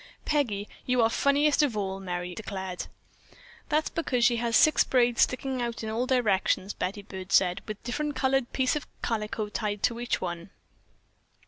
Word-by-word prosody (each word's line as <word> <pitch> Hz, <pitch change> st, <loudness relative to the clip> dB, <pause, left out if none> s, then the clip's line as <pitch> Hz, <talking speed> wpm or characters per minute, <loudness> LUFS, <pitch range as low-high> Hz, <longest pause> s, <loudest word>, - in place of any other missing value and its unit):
"Peggy, 225 Hz, -9 st, 0 dB, 0.2 s
you 250 Hz, 0 st, +2 dB
are 225 Hz, -, +3 dB
funniest 285 Hz, +3 st, +3 dB
of 265 Hz, -8 st, +1 dB
all," 195 Hz, -1 st, -2 dB
Merry 180 Hz, -1 st, -4 dB
declared. 190 Hz, -3 st, -5 dB, 0.8 s
"That's 305 Hz, 0 st, +1 dB
because 250 Hz, -7 st, +1 dB
she 240 Hz, -, +4 dB
has 230 Hz, 0 st, 0 dB
six 310 Hz, -, +5 dB
braids 245 Hz, -2 st, +2 dB
sticking 260 Hz, 0 st, +1 dB
out 235 Hz, -1 st, -3 dB
in 220 Hz, -, -3 dB
all 240 Hz, +3 st, -1 dB
directions," 205 Hz, -5 st, +1 dB
Betty 195 Hz, +3 st, -4 dB
Byrd 190 Hz, -2 st, -8 dB
said, 185 Hz, 0 st, +3 dB
"with 215 Hz, -1 st, -4 dB
a -, -, -39 dB
different 295 Hz, +4 st, -2 dB
colored 265 Hz, -1 st, +1 dB
piece 260 Hz, +1 st, +1 dB
of 300 Hz, -, -4 dB, 0.2 s
calico 215 Hz, -1 st, -2 dB
tied 210 Hz, -1 st, -3 dB
to 235 Hz, -1 st, +1 dB
each 240 Hz, 0 st, -1 dB
one." 175 Hz, 0 st, -5 dB
230 Hz, 175 wpm, -28 LUFS, 195-260 Hz, 0.8 s, six